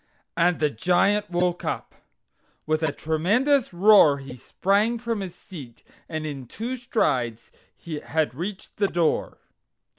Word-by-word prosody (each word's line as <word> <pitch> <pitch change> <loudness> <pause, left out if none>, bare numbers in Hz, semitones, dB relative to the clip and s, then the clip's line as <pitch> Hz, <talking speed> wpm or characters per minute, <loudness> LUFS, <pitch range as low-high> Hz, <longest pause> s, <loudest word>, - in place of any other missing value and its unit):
And 175 0 +2
the 150 -1 +1
Giant 180 - +2
woke 175 0 0
up. - - -4 0.7
With 155 +1 0
a 160 -2 +1
tremendous 210 - +1
roar 175 -5 +6
he 135 -2 -9
sprang 200 - 0
from 230 -2 -3
his 185 -3 -6
seat, 140 - -12 0.3
and 155 -1 -4
in 140 -4 -6
two 235 - -4
strides 125 - -1 0.5
had 155 -3 0
reached 185 +7 -7
the 205 - +2
door. 170 -4 0
175 Hz, 130 wpm, -24 LUFS, 150-205 Hz, 0.7 s, roar